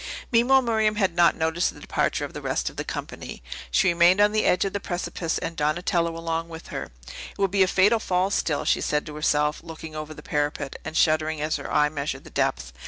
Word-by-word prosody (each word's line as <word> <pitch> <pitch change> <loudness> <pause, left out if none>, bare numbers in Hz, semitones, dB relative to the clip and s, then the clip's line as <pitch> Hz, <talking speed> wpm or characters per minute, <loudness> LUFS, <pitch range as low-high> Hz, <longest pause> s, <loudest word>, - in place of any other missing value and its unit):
Meanwhile 255 +3 +5
Miriam 220 -2 +1
had 190 -5 +1
not 175 -1 +5
noticed 160 +2 0
the - - -12
departure - - -1
of - - -10
the - - -6
rest - - -1
of - - -19
the - - -3
company; - - -7 0.3
she 190 - +3
remained 175 +2 +5
on 205 0 +5
the 215 0 +1
edge 180 - +3
of 195 - -3
the 200 - -1
precipice 175 -2 -3
and 165 - -4
Donatello 165 +2 0
along 165 0 -3
with 165 0 -10
her. - - -4 0.5
"It - - -23
would 195 -2 +1
be 200 0 +2
a 190 - +6
fatal 205 +5 +4
fall, 185 -1 0
still," 150 -6 0
she - - +2
said 150 0 0
to 150 - -8
herself, 150 0 +1
looking 160 -1 -9
over 155 0 -6
the 150 - -12
parapet, 145 -1 -2
and 160 - -4
shuddering 155 -1 +2
as 155 +1 -1
her 145 - -7
eye 150 0 +3
measured 145 -1 -4
the - - -13
depth. 60 -1 -1
165 Hz, 230 wpm, -25 LUFS, 155-190 Hz, 0.5 s, a